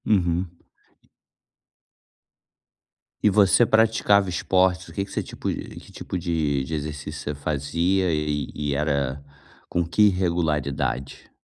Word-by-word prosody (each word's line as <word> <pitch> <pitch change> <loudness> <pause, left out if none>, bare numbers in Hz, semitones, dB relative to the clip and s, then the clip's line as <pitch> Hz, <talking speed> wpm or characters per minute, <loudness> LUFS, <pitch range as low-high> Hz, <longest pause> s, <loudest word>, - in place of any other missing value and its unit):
Uhum. 90 -3 +1 2.7
E 105 - +6
você 105 +3 +5
praticava 110 -3 +3
esportes, 90 +1 +1
o 80 - -12
que 100 - -2
que 100 - -16
você - - -1
tipo - - -4
de - - -7
que - - -16
tipo 95 - -5
de 80 -5 0
de 80 - -6
exercício 75 0 -4
você 75 0 -4
fazia 85 +6 0
e 75 -2 -1
e 75 -1 -2
era 70 -2 -1 0.5
com 85 -1 0
que 105 +5 +4
regularidade? 75 -8 -2
85 Hz, 125 wpm, -24 LUFS, 75-95 Hz, 2.7 s, E